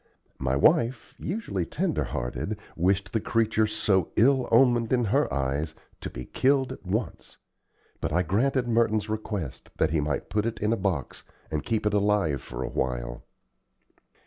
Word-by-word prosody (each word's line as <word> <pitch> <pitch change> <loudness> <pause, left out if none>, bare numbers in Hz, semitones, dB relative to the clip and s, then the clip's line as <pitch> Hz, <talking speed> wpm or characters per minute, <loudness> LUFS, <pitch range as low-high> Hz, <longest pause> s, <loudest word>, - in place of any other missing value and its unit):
My 65 0 0
wife, 115 - +2
usually 165 - -2
tender - - -1
hearted, 80 - -3 0.2
wished 95 +3 +1
the 110 - +2
creature, 110 -1 +2
so 100 -4 +1
ill 130 +3 +4
omened 120 -1 +4
in 125 -2 +3
her 100 - +2
eyes, 70 +4 -1 0.2
to - - -5
be 60 - -7
killed 135 0 +2
at - - -13
once, 100 -1 -3 0.6
but - - -2
I 90 +3 +2
granted 120 - +1
Merton's 110 -2 +2
request 105 - -4
that - - +2
he 80 -2 +2
might 75 -1 -2
put 105 +1 +1
it 115 - -3
in 105 +2 +1
a - - +3
box 95 - -2 0.3
and 75 -1 -1
keep 110 -2 -1
it 105 - +2
alive 100 -9 +2
for 60 +1 -6
a - - -3
while. - - -2
105 Hz, 165 wpm, -27 LUFS, 75-115 Hz, 0.6 s, ill